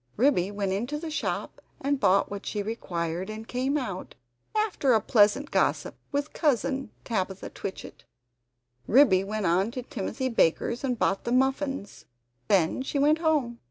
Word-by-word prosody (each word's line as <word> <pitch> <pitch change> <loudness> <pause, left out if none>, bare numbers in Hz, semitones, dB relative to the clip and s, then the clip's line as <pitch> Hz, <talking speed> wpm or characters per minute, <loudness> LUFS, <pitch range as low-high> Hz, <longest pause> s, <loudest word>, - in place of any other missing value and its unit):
Ribby 220 -7 +3
went 200 -2 -2
into 240 +10 -2
the 320 +1 -6
shop 305 - -3 0.2
and 280 0 0
bought 195 -5 +3
what 200 -1 -5
she 205 -1 -3
required, 180 -4 -3
and 220 +1 -7
came 260 +4 0
out, 200 -10 -5 0.4
after 415 - +2
a 220 - +5
pleasant 215 +7 +3
gossip - - +1 0.2
with 285 +1 -2
Cousin 270 -2 0
Tabitha 190 -4 -3
Twitchit. 195 - -7 0.8
Ribby 220 -7 +5
went 210 +1 -3
on 180 +5 +2
to 250 +1 -6
Timothy 260 +2 -3
Baker's 235 - +1
and 250 -3 0
bought 195 -2 +1
the 235 - -3
muffins. 265 -3 0 0.4
Then 185 +4 +2
she 270 +2 -3
went 300 +3 +4
home. 295 -8 +1
235 Hz, 155 wpm, -27 LUFS, 200-275 Hz, 0.8 s, a